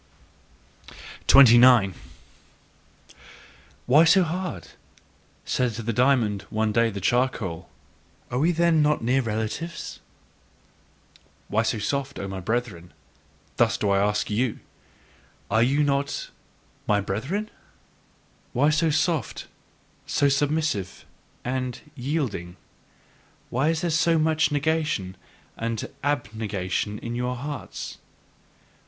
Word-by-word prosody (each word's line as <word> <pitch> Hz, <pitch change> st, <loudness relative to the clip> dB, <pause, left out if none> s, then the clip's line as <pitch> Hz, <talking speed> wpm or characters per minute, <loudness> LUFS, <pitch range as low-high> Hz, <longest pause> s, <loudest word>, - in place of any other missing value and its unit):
29. 120 Hz, -6 st, +7 dB, 1.9 s
"Why 145 Hz, +6 st, +6 dB
so 185 Hz, +3 st, +5 dB
hard!" 180 Hz, +2 st, -4 dB, 0.8 s
said 125 Hz, -2 st, 0 dB
to 115 Hz, -, -5 dB
the 115 Hz, +2 st, -2 dB
diamond 120 Hz, -5 st, +2 dB
one 110 Hz, 0 st, 0 dB
day 115 Hz, +1 st, +3 dB
the 100 Hz, -2 st, -5 dB
charcoal; 100 Hz, -7 st, -1 dB, 0.6 s
"are 125 Hz, -, -1 dB
we 165 Hz, +5 st, +3 dB
then 170 Hz, -1 st, +3 dB
not 150 Hz, -4 st, +1 dB
near 130 Hz, +3 st, +2 dB
relatives?" 110 Hz, +9 st, -4 dB, 1.5 s
Why 110 Hz, -, +2 dB
so 115 Hz, 0 st, -1 dB
soft? 140 Hz, +5 st, -2 dB
O 100 Hz, -, -4 dB
my 95 Hz, -1 st, -5 dB
brethren; 95 Hz, -5 st, -3 dB, 0.6 s
thus -, -, +3 dB
do 100 Hz, -, 0 dB
I 100 Hz, -, +3 dB
ask 105 Hz, +1 st, +1 dB
you: 115 Hz, +2 st, 0 dB, 0.9 s
are 110 Hz, +2 st, +3 dB
ye 130 Hz, +4 st, +3 dB
then 150 Hz, -, +3 dB
not 140 Hz, 0 st, -1 dB, 0.6 s
my 105 Hz, -1 st, +3 dB
brethren? 130 Hz, -, -3 dB, 1.0 s
Why 145 Hz, +5 st, +3 dB
so 160 Hz, +1 st, +2 dB
soft, 155 Hz, 0 st, -1 dB, 0.6 s
so 145 Hz, -, +2 dB
submissive 140 Hz, -, -1 dB, 0.4 s
and 125 Hz, -1 st, -3 dB, 0.2 s
yielding? 125 Hz, -, -3 dB, 0.9 s
Why 135 Hz, +5 st, +1 dB
is 165 Hz, -1 st, 0 dB
there 175 Hz, -, -1 dB
so 165 Hz, +1 st, +3 dB
much 155 Hz, 0 st, +2 dB
negation 145 Hz, -, -1 dB, 0.4 s
and 115 Hz, -1 st, -3 dB, 0.2 s
abnegation 105 Hz, -6 st, -2 dB
in 115 Hz, +2 st, -6 dB
your 125 Hz, +1 st, -2 dB
hearts? 130 Hz, -5 st, -7 dB
125 Hz, 110 wpm, -25 LUFS, 105-150 Hz, 1.9 s, 29